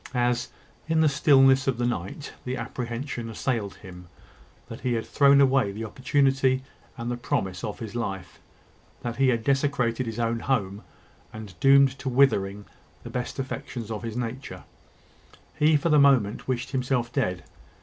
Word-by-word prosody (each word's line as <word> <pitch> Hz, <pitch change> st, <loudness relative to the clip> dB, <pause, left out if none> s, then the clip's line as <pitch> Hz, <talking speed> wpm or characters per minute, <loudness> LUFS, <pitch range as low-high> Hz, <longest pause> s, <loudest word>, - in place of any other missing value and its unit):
As, 120 Hz, 0 st, +1 dB, 0.4 s
in 160 Hz, 0 st, +3 dB
the 160 Hz, -, +5 dB
stillness 135 Hz, -2 st, +4 dB
of 130 Hz, -3 st, +1 dB
the 120 Hz, -, -1 dB
night, 120 Hz, -, -4 dB
the 125 Hz, 0 st, -3 dB
apprehension 120 Hz, 0 st, -5 dB
assailed 110 Hz, -3 st, -2 dB
him, 90 Hz, -1 st, -12 dB, 0.6 s
that -, -, -8 dB
he 125 Hz, -, -1 dB
had 115 Hz, -1 st, -2 dB
thrown 140 Hz, -1 st, +4 dB
away 135 Hz, -6 st, +3 dB
the 110 Hz, +3 st, -6 dB
opportunity 130 Hz, +2 st, +1 dB, 0.3 s
and 120 Hz, 0 st, -4 dB
the 120 Hz, -, -3 dB
promise 95 Hz, -6 st, -2 dB
of 105 Hz, -, -4 dB
his 110 Hz, -2 st, -7 dB
life 95 Hz, -6 st, -5 dB, 0.6 s
that 120 Hz, -1 st, -4 dB
he 135 Hz, 0 st, +3 dB
had 120 Hz, -3 st, +1 dB
desecrated 135 Hz, -3 st, 0 dB
his 115 Hz, 0 st, -5 dB
own 115 Hz, 0 st, 0 dB
home, 105 Hz, -6 st, -1 dB, 0.5 s
and 110 Hz, -3 st, -9 dB
doomed 135 Hz, 0 st, +5 dB
to 135 Hz, -, -3 dB
withering 105 Hz, -6 st, +2 dB, 0.4 s
the -, -, -8 dB
best 125 Hz, -1 st, -4 dB
affections 125 Hz, -4 st, -5 dB
of 110 Hz, -, -4 dB
his 115 Hz, 0 st, -5 dB
nature, 125 Hz, +2 st, -5 dB, 1.0 s
he 155 Hz, 0 st, +5 dB
for 170 Hz, +3 st, -1 dB
the 150 Hz, -1 st, +5 dB
moment 130 Hz, -7 st, +3 dB
wished 125 Hz, -1 st, -2 dB
himself 125 Hz, -2 st, -1 dB
dead. 90 Hz, -1 st, -1 dB
125 Hz, 160 wpm, -26 LUFS, 115-135 Hz, 1.0 s, the